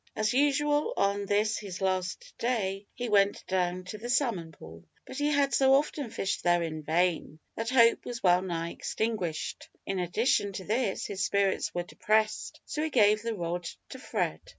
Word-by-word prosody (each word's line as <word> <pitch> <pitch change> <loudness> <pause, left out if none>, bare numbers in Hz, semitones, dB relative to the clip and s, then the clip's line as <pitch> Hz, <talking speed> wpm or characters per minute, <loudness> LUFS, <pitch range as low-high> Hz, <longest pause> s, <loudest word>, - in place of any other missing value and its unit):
As 215 +2 +1
usual, 295 - +2
on 200 0 +1
this 210 +2 +1
his 195 -3 -7
last 190 - -2
day, 200 -5 -1
he 245 - -3
went 200 -2 +2
down 180 -1 -1
to 210 +4 -8
the 240 +3 -6
salmon 235 - 0
pool, 80 - -13 0.2
but - - -9
he 290 - +1
had 285 -2 +2
so 270 0 +5
often 285 -2 0
fished 195 -2 -2
there 175 -1 +3
in 155 -1 -4
vain, 165 0 0 0.2
that 225 +1 -3
hope 235 -3 +5
was 240 -1 -6
well 180 -1 +5
nigh 170 -2 -3
extinguished. 210 -8 -3 0.2
In 195 -1 -2
addition 200 +3 +1
to 190 - -5
this, 215 0 -1
his 195 -1 -3
spirits 200 -1 +1
were 175 - -1
depressed, 215 +4 0
so 300 - -3
he 315 - 0
gave 215 -5 +4
the 230 0 -3
rod 175 -1 -3 0.2
to 260 - -8
Fred. - - -2
205 Hz, 180 wpm, -29 LUFS, 180-245 Hz, 0.2 s, so